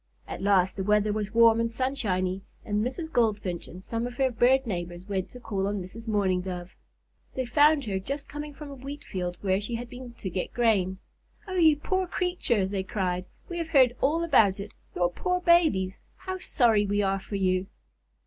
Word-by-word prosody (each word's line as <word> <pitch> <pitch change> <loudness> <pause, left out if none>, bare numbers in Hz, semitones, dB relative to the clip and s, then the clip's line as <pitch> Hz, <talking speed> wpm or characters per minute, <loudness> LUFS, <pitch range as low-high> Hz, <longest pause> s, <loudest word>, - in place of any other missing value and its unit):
At - - -6
last 190 -2 +3
the 190 - -1
weather 210 +1 +2
was 210 -1 -3
warm 230 0 +6
and 230 0 +1
sunshiny, 205 -7 -1 0.2
and 210 0 0
Mrs. 315 +7 -4
Goldfinch 205 -7 0
and 185 +2 -11
some 230 +3 -2
of 245 - -8
her 265 0 +2
bird 255 +3 +3
neighbors 175 -3 -5
went 190 -2 -2
to 250 - -11
call 200 -5 -2
on 205 0 -1
Mrs. 215 +5 -9
Mourning 195 -4 +1
Dove. 180 0 -6 0.6
They 260 - -1
found 290 +3 +4
her 195 -3 -1
just 275 +9 -5
coming 295 0 -6
from 295 0 -9
a - - -6
wheat 275 +3 -8
field, 180 -2 -4
where 190 0 +1
she 230 +3 -4
had 240 +1 -6
been 250 -1 -9
to 205 -5 -6
get 180 +1 -3
grain. 200 -6 +2 0.5
"Oh, 375 - -5
you 320 -5 +5
poor 375 +5 -1
creature!" 355 - 0
they 195 0 -2
cried. 185 -2 -2 0.2
"We 345 -1 -4
have 330 -1 -3
heard 260 -5 +5
all 325 +4 +2
about 220 - +4
it. 200 +1 -6 0.2
Your 175 0 +1
poor 360 - -1
babies! 320 - +3 0.2
How 375 0 -5
sorry 225 - +3
we 205 +1 +1
are 195 0 +1
for 195 +2 -7
you!" 185 -1 +1
215 Hz, 200 wpm, -27 LUFS, 190-270 Hz, 0.6 s, warm